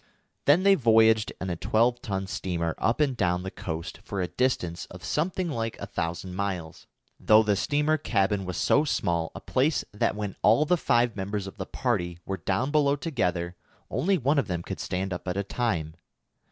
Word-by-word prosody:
Then 155 +6 +5
they 200 0 +6
voyaged 110 - +4
in 95 -1 -3
a - - -1
twelve 120 +7 +1
ton 95 -4 -3
steamer 85 -3 -2
up 115 +5 +1
and 140 -4 +2
down 90 -4 0
the 95 - -5
coast 80 +1 -6
for 100 - -4
a 90 - 0
distance 90 -10 -1
of - - -12
something 180 +4 -1
like 115 -7 -3
a - - -4
thousand 85 +2 -4
miles, 90 -4 -4 0.3
though 110 +1 +6
the 105 -1 +2
steamer 150 +8 +1
cabin 100 -6 +1
was 90 -1 -4
so 145 - +3
small 85 - 0
a - - -5
place 140 +4 +1
that 105 - 0
when 105 -2 -4
all 115 +8 +5
the 180 - +3
five 120 -7 +2
members 100 0 -3
of 95 - -9
the - - -5
party 90 -9 -1
were 95 - -3
down 100 +11 -1
below 145 -2 +3
together, 90 - -2 0.4
only 195 +2 +2
one 140 +1 +2
of 135 - -1
them 85 -3 -3
could - - -6
stand 95 +1 -2
up 90 - -7
at 90 +1 -2
a 100 - 0
time. 95 -8 -2
105 Hz, 195 wpm, -27 LUFS, 90-130 Hz, 0.4 s, they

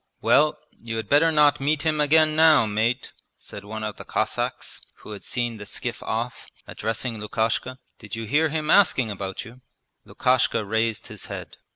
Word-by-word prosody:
'Well, 140 +8 +3 0.2
you 115 -1 -5
had 110 -2 -4
better 155 +3 +5
not 150 -1 +4
meet 145 +2 0
him 155 -2 +1
again 155 +1 +4
now, 155 -6 +6
mate!' 110 +5 -1 0.3
said 100 - -10
one 110 +1 -6
of 105 -1 -4
the - - -8
Cossacks - - -3 0.2
who - - -11
had 105 - -8
seen 120 -2 -2
the 105 - -9
skiff - - -5
off, 115 +1 -4 0.2
addressing 115 +1 -3
Lukashka. 115 +4 -1 0.2
'Did 105 +2 -8
you 115 0 -5
hear 150 +8 +2
him 155 0 -1
asking 135 - +4
about 95 -1 -5
you?' 120 +3 -14 0.4
Lukashka 125 -4 +1
raised 110 +2 -1
his - - -9
head. - - -8
120 Hz, 175 wpm, -24 LUFS, 110-150 Hz, 0.4 s, now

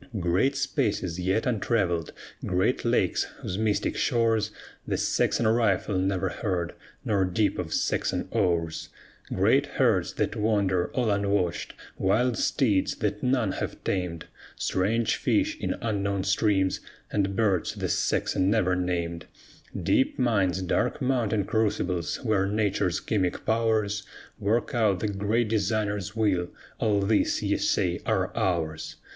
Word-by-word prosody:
Great 90 +11 +2
spaces 105 -10 -1
yet 95 +5 0
untravelled, 100 -8 0 0.3
great 90 0 +1
lakes - - +1 0.2
whose 95 - -4
mystic 110 -2 0
shores 115 -4 +1 0.4
The - - 0
Saxon 115 - +1
rifle 110 -3 +2
never 95 0 0
heard, 90 -4 -2 0.3
nor 100 -3 +2
dip 95 +3 0
of - - -4
Saxon - - 0
oars; 85 -2 0 0.4
Great - - +3
herds - - +2
that - - -1
wander 100 -4 +1
all 120 -4 +1
unwatched, 100 -3 0 0.2
wild 120 +6 +2
steeds 105 -6 +1
that 105 0 -2
none 125 -5 +1
have - - -5
tamed, 90 -4 -2 0.3
Strange 110 +5 0
fish 305 +1 +1
in - - -1
unknown 100 -3 -1
streams, 95 -1 +2 0.3
and 100 -1 0
birds 100 -6 +1
the - - -2
Saxon 95 +1 +1
never 95 -4 +2
named; 85 -2 -2 0.5
Deep 130 - +1
mines, 100 -7 +1
dark 90 - 0
mountain 115 -6 +1
crucibles, 100 -6 0
where 100 -4 +2
Nature's 100 -4 0
chemic 95 -5 -1
powers 110 -2 +1 0.4
Work 110 +4 0
out 105 -6 +2
the 105 - -1
Great 105 +4 0
Designer's 105 -1 -1
will; 95 -6 +1 0.3
all 105 -2 +2
these 105 +2 +1
ye - - +1
say - - +1
are - - 0
ours! 80 -4 -1
100 Hz, 130 wpm, -27 LUFS, 95-110 Hz, 0.5 s, Great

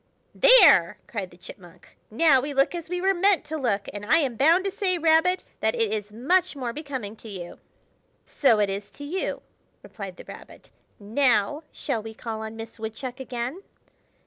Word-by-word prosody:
"There!" - - +6
cried 200 -5 -5
the 175 - -18
Chipmunk. 180 0 -15
"Now 270 +3 +4
we 285 +1 -5
look 275 +4 +2
as 340 -2 -6
we 360 0 -2
were 385 +2 +2
meant 390 +1 +2
to 315 - -5
look; 230 -9 -1
and 205 0 -7
I 240 +10 +4
am 275 -7 0
bound 330 - +4
to 395 - -1
say, 385 -3 0
Rabbit, 330 +3 +3 0.2
that 220 +1 0
it 225 -3 0
is 210 -1 -4
much 300 - +1
more 250 -4 -4
becoming 265 -8 -6
to 225 - -12
you." 180 -4 -8 0.7
"So 255 -6 +2
it 205 - +3
is 200 +1 -6
to 285 - -9
you!" 345 +7 -4 0.4
replied - - -9
the - - -12
Rabbit. - - -13 0.3
"Now 230 +4 +1
shall 260 -7 -3
we 220 0 -9
call 225 -1 -6
on 220 0 -7
Miss 225 0 -9
Woodchuck 240 +4 -6
again?" 255 +6 -5
255 Hz, 185 wpm, -25 LUFS, 220-325 Hz, 0.7 s, There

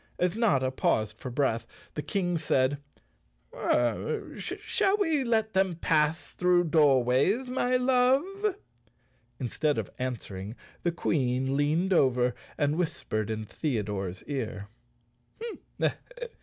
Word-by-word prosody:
As 180 +1 +1
Notta 140 - +2
paused 110 -4 0
for 130 - -5
breath, 120 -3 0 0.3
the 150 - -3
King 175 +3 -1
said, 145 -3 +1 1.6
"Shall 405 -1 0
we 325 -9 +2
let 220 -2 +1
them 190 -2 +2
pass 155 0 +1
through 180 -1 +3
Doorways, 150 - +3
my 255 0 +2
love?" 270 +11 +2 0.8
In¬ 130 - -2
stead 150 +4 0
of - - -3
answering 110 -5 -4 0.3
the 175 - +1
Queen 135 -5 0
leaned 160 +7 +2
over 125 -5 +3 0.2
and 145 +1 +1
whis¬ 175 -3 -2
pered 110 -1 -1
in 110 0 -3
Theodore's 105 - -3
ear. 110 -8 -4
150 Hz, 115 wpm, -28 LUFS, 125-195 Hz, 1.6 s, through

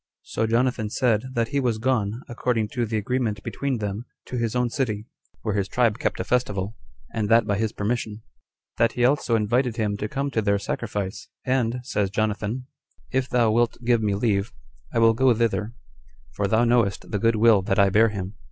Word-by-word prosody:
So 110 - -1
Jonathan 115 -1 +1
said, 115 -1 +1
That 115 -1 +1
he 140 - 0
was 120 -4 0
gone, 115 -1 0
according 120 -3 -1
to 120 -1 -2
the 110 0 -1
agreement 110 -1 -1
between 140 -3 -2
them, 105 +2 -4 0.2
to - - -6
his 115 -1 -1
own 125 -1 +1
city, 110 -6 -2 0.4
where 110 - -1
his 100 -1 0
tribe 115 -1 +1
kept - - -1
a - - 0
festival, 105 -5 -1 0.4
and 105 -2 -1
that 115 -1 +5
by 100 -1 0
his 110 -1 0
permission: 110 0 -3 0.5
that 115 0 +3
he 120 - +2
also 130 -3 +2
invited 120 +3 +1
him 105 -3 0
to 105 +1 -3
come 140 +2 -2
to 115 - +1
their 100 -1 +2
sacrifice; 105 -1 -4 0.2
"and," 125 -1 0
says 105 -6 -1
Jonathan, 110 +4 -2 0.5
"if 130 0 0
thou 120 -3 +3
wilt 120 +1 +2
give 120 -1 +3
me 105 -2 +1
leave, 100 -1 0 0.4
I - - -2
Will 115 0 +6
go 130 +3 +4
thither, 115 0 0 0.6
for 100 - -1
thou 110 +4 +3
knowest 115 -5 +1
the 105 - 0
good 115 +2 +3
will 110 -2 +5
that 95 +1 -1
I 100 -1 +5
bear 110 +3 +5
him." 100 -2 -5
115 Hz, 200 wpm, -24 LUFS, 105-120 Hz, 0.6 s, Will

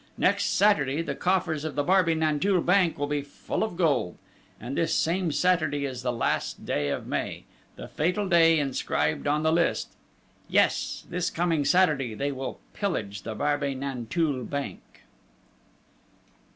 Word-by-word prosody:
Next - - +2
Saturday, 160 -7 +2
the - - -3
coffers 175 -5 0
of 155 -2 -4
the 145 - +1
Barbey 180 -1 +3
Nanteuil 160 +4 +1
bank 180 -1 +3
will 145 - -1
be 145 0 -1
full 140 +8 -4
of 215 -6 -4
gold, 140 - +1 0.4
and 125 +5 -5
this 165 - +1
same 170 0 +1
Saturday 165 -4 +1
is 130 -2 -5
the 125 0 -1
last 115 -2 -2
day 75 -1 -1
of - - -3
May, - - -3 0.3
the - - -8
fatal 180 +6 -1
day 165 -2 +5
inscribed 130 - -1
on 150 +1 +1
the 160 0 +3
list. 170 0 0 0.6
Yes, - - +1
this 180 0 -1
coming 165 -4 0
Saturday, 150 -11 +2
they 140 +6 -1
will 135 -1 -5
pillage 105 - -3
the 110 -1 -6
Barbey 145 +1 0
Nanteuil 135 +2 -2
bank!" 140 +2 -6
150 Hz, 150 wpm, -27 LUFS, 135-175 Hz, 0.6 s, day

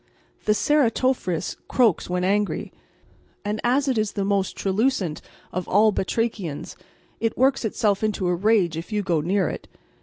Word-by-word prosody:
The 210 - +4
Ceratophrys 255 - +1
croaks 230 -10 +2
when 180 0 -1
angry, 205 +2 0 0.7
and 210 +1 -2
as 265 +4 +2
it 255 -4 +1
is 215 -1 -1
the 200 -2 -1
most 195 -1 0
truculent 195 - 0 0.3
of 185 0 -3
all 215 +3 +4
batrachians 190 -6 -2 0.4
it 225 0 -1
works 265 +1 +3
itself 210 -2 +1
into 210 -3 0
a 180 - +2
rage 190 -2 +2
if 165 +6 -6
you 210 -1 0
go 170 -5 +1
near 185 +3 +1
it. - - -6
205 Hz, 155 wpm, -24 LUFS, 185-225 Hz, 0.7 s, The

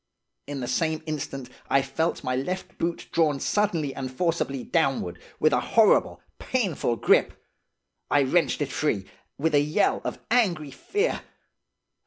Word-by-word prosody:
In 140 -2 -4
the 125 - -3
same 160 +1 0
instant 140 -4 -4 0.2
I 135 0 +4
felt 160 +5 -1
my 130 0 -1
left 180 +9 -4
boot 170 0 -2
drawn 155 -4 +2
suddenly 170 -9 0
and 130 -1 -5
forcibly 140 -3 -1
downward, 135 - 0 0.2
with 155 -1 +4
a - - +4
horrible, 225 -2 +3 0.2
painful 195 - 0
grip. - - +3 0.7
I 145 -1 +4
wrenched 145 +1 +2
it 140 - -5
free, 105 -11 0 0.3
with 160 +2 0
a 145 - +5
yell 150 +7 +1
of - - -3
angry 175 - +2
fear. 415 - -1
155 Hz, 145 wpm, -26 LUFS, 135-170 Hz, 0.7 s, a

